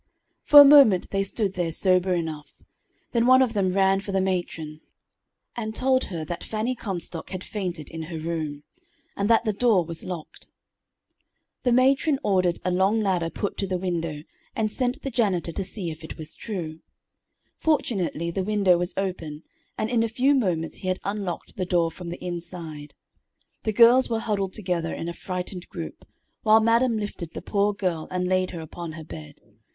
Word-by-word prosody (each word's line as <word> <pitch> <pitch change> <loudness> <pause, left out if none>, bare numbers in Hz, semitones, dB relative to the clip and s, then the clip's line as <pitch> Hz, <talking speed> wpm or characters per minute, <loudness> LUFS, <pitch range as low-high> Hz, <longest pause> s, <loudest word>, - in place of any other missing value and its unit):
For 295 -1 +8
a 285 - +12
moment 275 -10 +7
they 195 - +1
stood 195 0 -1
there 175 -3 -1
sober 185 +1 +3
enough; 160 -3 -5 0.6
then 235 0 +2
one 260 +1 +7
of 240 -3 -1
them 195 -3 +1
ran 195 0 +3
for 200 0 -6
the 195 - +1
matron, 175 -5 -3 0.7
and 220 -2 -4
told 260 +1 +2
her 165 -4 -5
that 170 +2 -5
Fanny 220 +3 -2
Comstock 180 -8 -5
had 185 -1 -5
fainted 180 -7 -4
in 165 -1 -6
her 165 - -5
room, 155 -3 -4 0.5
and 200 +2 -1
that 230 0 +5
the 215 -2 0
door 205 -5 +3
was 165 0 -6
locked. 175 -4 -8 1.1
The 245 - +1
matron 270 +4 +3
ordered 185 -5 +2
a 185 - +1
long 190 +5 +2
ladder 180 -5 0
put 200 - -4
to 195 - -1
the 185 -1 -1
window, 165 -4 -3 0.3
and 215 -1 0
sent 250 +1 -1
the 275 - -3
janitor 195 -8 0
to 195 - -3
see 185 -2 -5
if 160 +1 -10
it 160 - -8
was 155 -1 -7
true. 165 -7 -5 0.8
Fortunately 190 - 0
the 190 +2 -2
window 195 -3 +3
was 175 +1 -3
open, 170 -5 -4 0.3
and 215 - -1
in 235 0 +1
a 230 - +2
few 260 +5 +3
moments 180 - 0
he 185 - -7
had 185 0 0
unlocked 200 -4 -4
the 185 - -1
door 170 -2 +2
from 175 +1 -8
the 175 +1 -7
inside. 170 -4 -7 0.7
The 220 - +1
girls 240 +4 +6
were 230 - 0
huddled 200 -4 -2
together 175 -5 -2
in 165 - -5
a 170 - -3
frightened 180 0 -6
group, - - -8 0.3
while 220 -1 +6
madam 230 +1 +3
lifted 195 -5 -5
the - - -6
poor 205 0 +1
girl 180 -6 -2
and 180 0 -1
laid 185 0 +1
her 170 - -6
upon 160 +1 -7
her 160 0 -8
bed. 150 -1 -10
185 Hz, 185 wpm, -25 LUFS, 170-215 Hz, 1.1 s, a